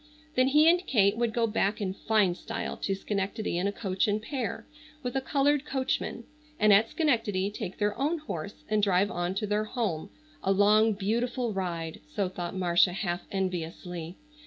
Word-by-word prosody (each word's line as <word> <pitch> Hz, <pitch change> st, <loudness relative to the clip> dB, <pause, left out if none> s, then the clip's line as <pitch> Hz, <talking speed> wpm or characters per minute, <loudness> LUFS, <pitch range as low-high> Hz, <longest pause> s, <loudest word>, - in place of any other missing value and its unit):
Then 255 Hz, +1 st, +3 dB
he 300 Hz, +3 st, +5 dB
and 350 Hz, +2 st, +5 dB
Kate 200 Hz, -5 st, +4 dB
would 235 Hz, 0 st, 0 dB
go 230 Hz, +1 st, +1 dB
back 210 Hz, -1 st, 0 dB
in 190 Hz, -3 st, -2 dB
fine 205 Hz, -2 st, +2 dB
style -, -, -5 dB
to 195 Hz, -, -2 dB
Schenectady 195 Hz, -1 st, -2 dB
in 190 Hz, -, +1 dB
a -, -, 0 dB
coach 195 Hz, -2 st, -1 dB
and 210 Hz, +1 st, +1 dB
pair, 240 Hz, 0 st, -4 dB, 0.4 s
with 250 Hz, +1 st, -3 dB
a 270 Hz, -, +1 dB
colored 285 Hz, +1 st, +2 dB
coachman, 265 Hz, -4 st, -2 dB, 0.4 s
and 215 Hz, -1 st, +6 dB
at 220 Hz, +3 st, +5 dB
Schenectady 225 Hz, -, +1 dB
take 190 Hz, -2 st, -6 dB
their 205 Hz, 0 st, 0 dB
own 300 Hz, +5 st, +1 dB
horse 200 Hz, -, -6 dB
and 215 Hz, 0 st, +1 dB
drive 200 Hz, 0 st, +3 dB
on 175 Hz, +1 st, -2 dB
to 210 Hz, -, -1 dB
their 210 Hz, +1 st, 0 dB
home, 215 Hz, -9 st, -2 dB, 0.3 s
a 195 Hz, -, +1 dB
long 210 Hz, +3 st, +5 dB
beautiful 235 Hz, +4 st, -1 dB
ride, 170 Hz, -4 st, -3 dB, 0.2 s
so 200 Hz, -2 st, +1 dB
thought 175 Hz, -1 st, -5 dB
Marcia 175 Hz, 0 st, +3 dB
half 175 Hz, -2 st, -3 dB
enviously. 175 Hz, -2 st, -4 dB
205 Hz, 180 wpm, -28 LUFS, 185-235 Hz, 0.4 s, and